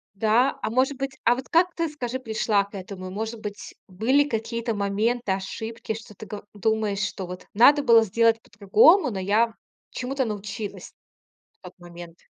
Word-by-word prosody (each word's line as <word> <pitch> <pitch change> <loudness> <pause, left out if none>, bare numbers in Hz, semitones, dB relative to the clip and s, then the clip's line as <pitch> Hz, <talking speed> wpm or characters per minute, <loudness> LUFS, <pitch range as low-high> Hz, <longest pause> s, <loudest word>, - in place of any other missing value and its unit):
Да, 225 +6 +2
а - - 0
может 260 +4 +1
быть, 275 +1 -3
а 240 +1 +4
вот 260 +1 -8
как 350 +2 +3
ты, 330 -1 0
скажи, 260 -4 -5
пришла 220 -4 +1
к 200 - -23
этому? 185 -1 -7
И 185 - -8
может 220 +3 -4
быть, 205 -1 -8
были 255 +10 +2
какие-то 230 -1 -3
моменты, 205 +3 0
ошибки, 220 +4 -4
что 220 -1 -10
ты, 215 - -10
го 205 0 -8
думаешь, 215 -1 0
что 190 -1 -3
вот 180 +1 -9
надо 285 +7 +6
было 230 -3 +6
сделать 225 +2 +2
по-другому, 225 - +4
но 195 - -4
я 215 +5 +2 0.4
чему-то 265 +1 -2
научилась 210 -1 -6 0.7
в - - -69
тот 180 - -11
момент. 175 -1 -11
220 Hz, 175 wpm, -25 LUFS, 200-245 Hz, 0.7 s, надо